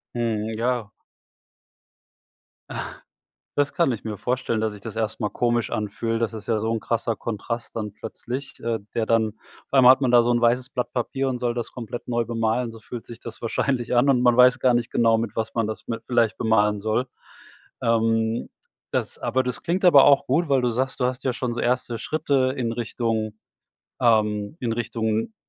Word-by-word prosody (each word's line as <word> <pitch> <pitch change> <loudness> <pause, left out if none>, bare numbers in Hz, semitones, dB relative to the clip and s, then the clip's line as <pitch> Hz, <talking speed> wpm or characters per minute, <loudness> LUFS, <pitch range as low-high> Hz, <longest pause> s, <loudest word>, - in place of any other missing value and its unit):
Mhm. 110 -2 -1
Ja. 120 -3 -1 1.8
Ach, - - -4 0.7
das 145 -1 +1
kann 165 -8 +2
ich 110 - -7
mir 105 -2 -4
vorstellen, 125 -1 -1
dass 110 -1 -1
sich 100 - -12
das 110 0 -7
erst 110 +1 -2
mal 105 - 0
komisch 120 +2 0
anfühlt. 115 +2 -2
Das 115 -1 0
ist 110 -2 -8
ja 110 -2 +1
so 110 +1 -1
'n 115 - -2
krasser 115 -1 -1
Kontrast 115 +2 -5
dann 105 -2 -4
plötzlich, 130 +5 -7
äh, 115 -1 -2
der 115 -1 0
dann 110 -1 +2 0.4
auf - - -46
einmal 130 -2 +8
hat 135 - -5
man 125 -2 +2
da 120 -1 +7
so 120 +1 +1
'n 120 0 +2
weißes 125 +2 +2
Blatt 125 -2 -3
Papier 135 +2 -1
und 125 - -2
soll 120 -1 0
das 120 -1 -4
komplett 120 0 -7
neu 120 -1 0
bemalen. 115 +1 0
So 115 -1 -13
fühlt 120 0 -8
sich 120 0 -10
das 115 - -9
wahrscheinlich 120 +1 -1
an 130 +4 +4
und 125 -2 +4
man 120 -1 +4
weiß 125 0 +6
gar 125 -1 +4
nicht 120 -1 0
genau, 115 -1 +3
mit 110 -2 -3
was 110 0 -2
man 115 -2 +1
das 110 - -6
mit 115 -1 -4
vielleicht 115 -5 +2
bemalen 105 -2 +2
soll. 110 +4 0 0.7
Ähm, 115 0 +1 0.4
das - - -2
aber 130 0 0
das 125 - -3
klingt 185 +3 0
aber 145 -6 +8
auch 140 -1 +5
gut, 155 +4 +1
weil 135 -2 +3
du 125 - +1
sagst, 130 +4 -1
du 125 - +2
hast 125 0 -2
ja 130 - +2
schon 125 -1 -2
so 120 - -3
erste 120 -1 0
Schritte 135 -1 0
in 115 -2 -1
Richtung, 115 -2 -2 0.7
ähm 105 +2 +2
in 115 -2 -1
Richtung 115 - -2
115 Hz, 205 wpm, -24 LUFS, 110-125 Hz, 1.8 s, einmal